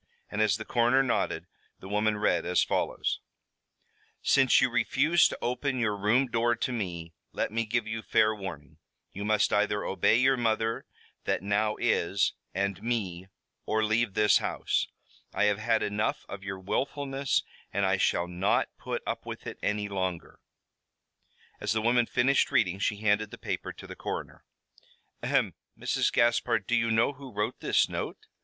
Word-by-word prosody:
And 105 - -1
as 105 -2 +3
the 110 - -7
coroner 120 +3 +3
nodded, 125 - -1 0.3
the 95 - -10
woman 105 +1 +1
read 95 -5 +1
as 90 +1 +2
follows: - - -1 1.0
"Since 135 -2 +5
you 130 -1 +2
refuse 145 +7 +3
to - - -6
open 130 +2 -1
your 110 -4 +1
room 105 +7 +3
door 120 -1 +1
to 130 - -2
me, 85 -8 -4 0.2
let - - -1
me 115 +1 -1
give 115 +1 0
you 110 0 -4
fair 110 0 +3
warning. 85 -9 -8 0.3
You 100 - -5
must 105 0 +2
either 105 0 +1
obey 95 - +3
your 130 +2 +4
mother 115 -1 0 0.4
that - - 0
now 105 +2 +1
is, 95 +3 +1 0.2
and 100 +1 -2
me, 95 -7 -2 0.4
or 110 0 +1
leave 110 -1 +1
this 105 0 +5
house. - - -1 0.5
I - - +2
have 105 0 +2
had 110 0 +1
enough 105 +1 -1
of 100 -1 -8
your 95 -1 -5
willfulness 135 +7 -1 0.3
and 100 0 +1
I 95 0 +2
shall 90 -1 +1
not 90 +3 +1
put - - -4
up - - -4
with - - -7
it - - -7
any 105 0 -1
longer." 95 -4 -4 1.2
As 105 0 -1
the 110 - +1
woman 120 +1 +3
finished 135 +3 +2
reading 95 -2 +2
she 105 - +1
handed 105 0 +2
the - - -10
paper - - -4
to - - -12
the - - -9
coroner. - - -6 0.8
"Ahem! - - +1 0.2
Mrs. - - 0
Gaspard, 120 0 +2
do - - -2
you 115 -1 +2
know 115 +5 +3
who 135 -1 -11
wrote 105 0 -2
this - - +2
note?" - - -5
110 Hz, 170 wpm, -28 LUFS, 100-120 Hz, 1.2 s, Since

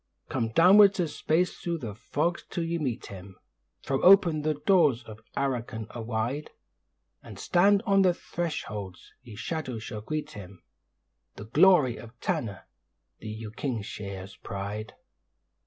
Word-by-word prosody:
Come 115 -4 -1
downwards 195 - +6
a 175 - +2
space 160 +4 0
thro' 170 -1 -2
the 115 -9 -6
fogs 160 - -2
till 175 - -2
ye 165 0 -2
meet 130 -6 -3
him, 95 -1 -10 0.5
Throw 135 0 -1
open 180 -5 +6
the 155 0 0
doors 150 -5 +3
of 110 -2 -11 0.2
Arrochin 120 -5 -2
awide, 120 +5 -3 0.7
And - - -11
stand 200 +4 +3
on 195 -2 +4
the 180 -2 +3
thresholds, 105 - -5
ye 120 -5 -12
Shadows 130 -3 -4
to 105 - -6
greet 155 +5 -4
him 100 -8 -11 0.7
The 105 - -9
glory 150 - +5
of 120 +1 -13
Tanna, 100 -4 -3 0.6
the 110 - -7
Uking'shaa's 105 -4 -5
pride. 100 +2 -6
130 Hz, 135 wpm, -28 LUFS, 110-170 Hz, 0.7 s, downwards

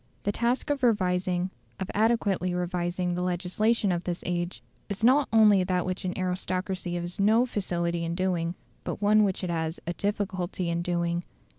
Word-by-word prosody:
The 205 - +1
task 240 +6 0
of 285 -2 -1
revising, 185 -5 +1 0.3
of 190 - -3
adequately 205 -5 +1
revising 180 0 -1
the 180 - -2
legislation 185 +4 +1
of 175 0 -1
this 175 -1 -3
age, 175 0 -2 0.3
is 200 +1 -4
not 260 +4 +5
only 210 -4 +6
that 180 -1 0
which 185 +1 -3
an 180 - -2
aristocracy 185 0 -2
has 175 +3 -4
no 220 +5 +4
facility 175 -6 -1
in 165 0 -2
doing, 175 -2 0 0.3
but - - -4
one 210 +1 +5
which 195 -1 0
it 180 - -1
has 160 0 -2
a 175 - -2
difficulty 190 -3 -2
in 170 0 0
doing. 170 0 -1
185 Hz, 170 wpm, -27 LUFS, 175-205 Hz, 0.3 s, only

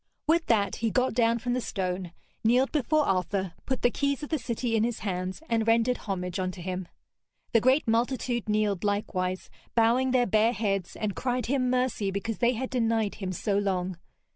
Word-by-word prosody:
With 325 +2 +2
that 200 -4 +2
he 230 - 0
got 255 +4 +1
down 230 0 +3
from 245 +1 -2
the 255 - 0
stone, 185 -4 -3 0.3
kneeled 250 +4 +3
before 305 +1 +2
Arthur, 190 -1 0
put 260 -1 -2
the 245 - +4
keys 280 +2 -1
of 295 - -5
the 315 - 0
city 235 -1 -2
in 220 - +3
his 235 -1 -2
hands, 185 - -3
and 225 -1 0
rendered 230 +2 +3
homage 180 -3 -4
unto 185 -1 -3
him. 185 0 -4 0.7
The 230 - +5
great 260 +4 +3
multitude 240 0 0
kneeled 210 -3 +1
likewise, 185 -3 -1 0.2
bowing 235 +3 +3
their 250 -1 +3
bare 220 +2 +3
heads, 195 -6 -1
and 210 -2 -2
cried 250 -2 -1
him 255 0 +1
mercy 250 -5 0
because 200 +3 -3
they 240 0 +3
had 255 +2 -4
denied 225 -4 +1
him 185 -1 -2
so 200 +3 0
long. 185 -3 -1
225 Hz, 190 wpm, -28 LUFS, 195-250 Hz, 0.7 s, The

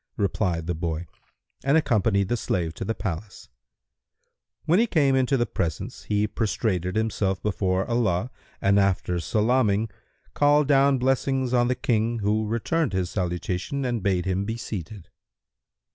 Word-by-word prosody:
replied 90 -5 0
the 90 - -1
boy 85 0 -3 0.6
and 140 +4 +4
accompanied 105 -8 +2
the 120 - 0
slave 85 -7 -2
to - - -6
the 115 - -2
palace. 95 0 -6 1.2
When 170 +5 +4
he 235 - +3
came 145 -9 +3
into 130 +1 +2
the 120 - +1
presence, 85 -7 -4
he 105 0 +1
prostrated 100 -5 -1
himself 105 -4 0
before 95 -2 0
Allah 115 -2 0 0.3
and 100 +1 +3
after 95 -2 +1
salaming, 110 +3 +1 0.4
called 145 0 +4
down 140 -1 +4
blessings 130 0 0
on 120 -1 +3
the 125 - +1
King 115 -2 0
who 105 +1 0
returned 120 - 0
his 95 -1 -1
salutation 90 - -2
and 120 -3 -1
bade 95 -2 0
him 95 +1 0
be 115 +3 -3
seated. 100 -4 -7
105 Hz, 145 wpm, -25 LUFS, 95-125 Hz, 1.2 s, and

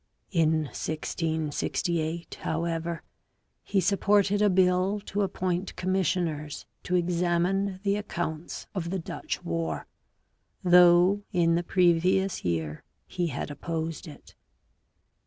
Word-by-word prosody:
In 160 -3 +2
1668, 160 +1 -2
however, 165 0 -2 0.6
he 200 - 0
supported 200 +2 +3
a 210 - +5
bill 185 +2 +3
to 205 0 -3
appoint 185 -1 -2
commissioners 175 -5 -1 0.2
to 180 - -1
examine 180 +2 +1
the 200 0 +1
accounts 170 -5 -4
of 170 -3 -3
the 190 - -1
Dutch 165 - -5
War, 85 -1 -2 0.8
though 180 +2 +6
in 170 -4 +3
the 170 - +2
previous 180 +2 +2
year 80 -3 -2 0.2
he 175 -1 -2
had 145 0 -4
opposed 165 +2 -4
it. 150 - -13
175 Hz, 105 wpm, -27 LUFS, 160-190 Hz, 0.8 s, though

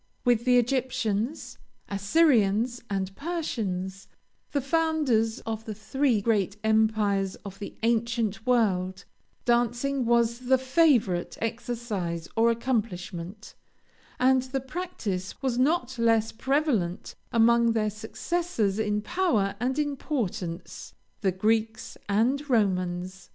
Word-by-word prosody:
With 240 -1 +3
the 250 -1 +5
Egyptians, 245 0 -1 0.3
Assyrians, 225 0 +2
and 195 -1 -2
Persians, 195 - -3 0.4
the 285 - +1
founders 275 -7 +1
of 225 0 -5
the 215 - -5
three 240 +1 +1
great 205 -2 +1
empires 215 -3 +2
of 195 0 -8
the 205 - -8
ancient 230 -2 0
world, 190 -6 +1 0.4
dancing 240 +2 +1
was 235 0 +2
the 260 0 +5
favorite 260 - +2
exercise 225 -7 -3
or 230 +1 +4
accomplishment, 210 -5 -3 0.7
and 260 +1 +4
the 260 +1 -3
practice 260 - -5
was 250 -2 0
not 260 -3 +1
less 225 -1 +3
prevalent 255 - 0 0.2
among 235 0 +4
their 215 -2 0
successors 220 - -2
in 210 -1 0
power 250 - +1
and 255 +4 -1
importance, 260 - -3 0.2
the 195 -3 +1
Greeks 220 +3 0
and 255 +8 +1
Romans. 185 -4 0
225 Hz, 110 wpm, -27 LUFS, 200-260 Hz, 0.7 s, the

